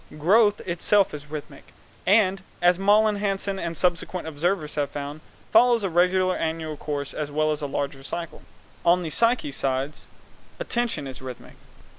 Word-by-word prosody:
Growth 205 +7 +4
itself 190 +3 +2
is 150 0 -8
rhythmic, 150 -1 -9 0.3
and, 195 -1 +4 0.2
as 175 +1 +3
Malling 210 +1 +4
Hansen 195 -1 -2
and 170 -2 -3
subsequent 180 0 -1
observers 160 +1 -1
have 145 -2 -1
found, 145 +2 -6 0.3
follows 235 0 +5
a 190 - -1
regular 185 +2 +3
annual 160 -1 -3
course 145 -1 -4
as 150 -1 -4
well 155 +1 +1
as 150 0 -2
a 145 - -2
larger 140 -1 -3
cycle. 170 +4 -6 0.4
On 175 +1 +4
the 160 - -4
psychic 230 - +2
sides 135 +2 -2 0.5
attention 240 - -1
is 130 -1 -8
rhythmic. 130 -2 -9
170 Hz, 155 wpm, -25 LUFS, 150-195 Hz, 0.5 s, follows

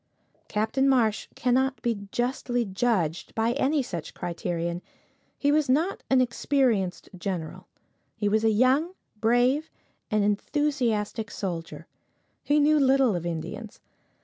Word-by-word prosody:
Captain 220 +6 +1
Marsh 230 -5 +2
cannot 260 +2 +1
be 220 -5 -2
justly 245 -1 -1
judged 190 -6 -1
by 225 +1 +2
any 275 +2 +1
such 175 -10 -6
criterion. 170 0 -3 0.6
He 285 - +2
was 300 -2 +2
not 320 +9 +1
an 265 -1 +5
experienced 235 -6 0
general. 180 -3 -5 0.5
He 205 - -1
was 215 +2 +2
a 225 - +4
young, 260 - +2 0.2
brave, 245 +7 +2 0.4
and 215 -3 +2
enthusiastic 225 -1 0
soldier. 170 -6 -5 0.6
He 295 +1 +2
knew 300 +1 +4
little 265 -5 +4
of 175 0 -3
Indians. 170 +7 -6
235 Hz, 120 wpm, -26 LUFS, 200-270 Hz, 0.6 s, an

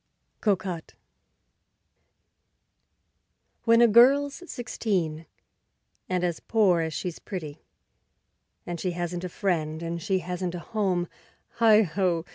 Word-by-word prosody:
Cocotte 190 -5 -1 2.7
When 230 0 +5
a - - +7
girl's 275 +7 +5
sixteen, 180 - -2 0.8
and 180 -1 0
as 175 -3 -1
poor 200 -6 +2
as 160 0 -2
she's 180 -3 -4
pretty, 160 -7 -7 1.0
And 175 -1 -5
she 180 0 -2
hasn't 175 0 -3
a 180 - -3
friend 165 -4 -2
and 170 0 -4
she 190 +3 0
hasn't 180 0 -4
a - - -4
home, 185 -3 -1 0.5
Heigh 220 -2 +6
ho! 180 -2 0
180 Hz, 110 wpm, -26 LUFS, 170-210 Hz, 2.7 s, a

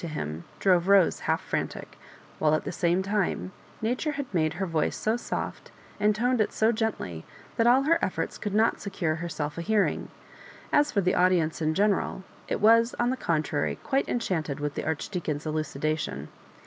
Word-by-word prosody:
to - - -2
him, 80 - -5
drove 180 -2 +3
Rose 195 -3 +5
half - - +3
frantic; - - -4 0.4
while, 155 0 +3
at - - -2
the - - -4
same 175 +1 +1
time, 190 - -1 0.3
Na 225 +2 +2
ture 300 +3 -2
had 285 -1 -3
made 155 -3 +1
her 190 +3 -2
voice 165 -3 0
so 220 +1 +1
soft, 240 - -4 0.3
and 210 0 +3
toned 245 +1 +2
it 215 - +1
so 220 +1 +2
gently, 215 - -3 0.3
that 230 - +3
all 255 +3 +5
her 335 +3 +3
efforts - - -2
could 205 -2 -3
not 220 +1 +2
secure 190 -6 -1
her 170 +1 -4
self 150 0 -4
a - - -2
hearing. 205 +3 +1 0.6
As 295 0 +4
for 200 - +2
the 185 +1 +2
audience 180 -4 +2
in 155 0 +1
general, 200 -1 +1 0.2
it - - -1
was, 230 +2 +5
on 240 +1 +2
the - - 0
contrary, 155 - -1
quite 270 0 0
enchanted 160 - -1
with 145 0 -2
the - - -4
Archdeacon's 160 -1 -3
elucndation. 155 - -2
185 Hz, 185 wpm, -27 LUFS, 155-220 Hz, 0.6 s, Rose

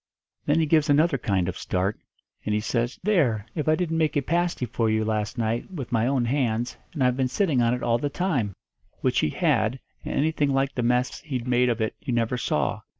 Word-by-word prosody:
Then 150 +2 +3
he 160 - +3
gives 155 0 +3
another 145 -1 +3
kind 95 -5 0
of 90 - -4
start, 95 +3 -1 0.4
and 105 - 0
he - - +2
says, 120 +3 -1
'There! 140 - +2
If 155 -2 -3
I 155 - +5
didn't 165 -1 -1
make 155 -2 +1
a 140 - +1
pasty 170 -3 0
for 115 -1 0
you, 110 0 +1
last 110 +1 -2
night, 115 0 -1
with 150 -10 -6
my 115 0 +2
own 130 -3 +1
hands, 120 -2 0 0.2
and 145 -5 0
I've 125 -1 +3
been 130 -1 +1
sitting 150 - +1
on 120 +1 +3
it 125 - -6
all 120 0 +2
the 145 - -1
time,' 135 - -1 0.5
which - - +2
he - - +1
had, 110 - +1 0.2
and - - -4
anything 150 -1 +1
like 135 0 +1
the 125 - -2
mess 125 +2 +1
he'd 130 -5 -4
made 125 0 +3
of 120 -1 -1
it 110 - 0
you 125 - -4
never 115 +1 +1
saw. 125 - -1
125 Hz, 225 wpm, -25 LUFS, 115-150 Hz, 0.5 s, I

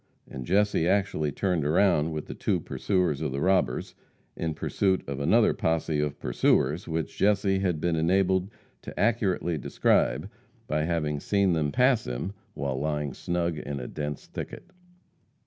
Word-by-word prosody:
And 65 -2 -7
Jesse 100 -3 +2
actually 95 -6 +1
turned 90 +1 0
around 80 0 +3
with 75 -1 -4
the - - -7
two - - 0
pursuers 90 -7 -1
of 75 -4 -1
the 70 - -2
robbers, 90 -8 +1 0.4
in 80 -2 -3
pursuit 95 +3 0
of 70 -1 -4
another 70 - +4
posse 80 -2 0
of 75 -1 -1
pursuers - - +1
which 80 -1 -3
Jesse 100 -1 +2
had 90 -5 0
been 85 +1 0
enabled 95 +3 +2 0.3
to - - -8
accurately 95 -8 +1
describe - - +1 0.4
by 75 0 0
having 75 -3 -1
seen 100 +2 +2
them 75 -3 0
pass 125 - +3
him 60 +11 -3 0.2
while 65 -2 -2
lying 75 -2 -2
snug 85 -2 -2
in 70 -1 -5
a 60 - -6
dense 75 -1 -5
thicket. - - -8
80 Hz, 155 wpm, -27 LUFS, 75-95 Hz, 0.4 s, another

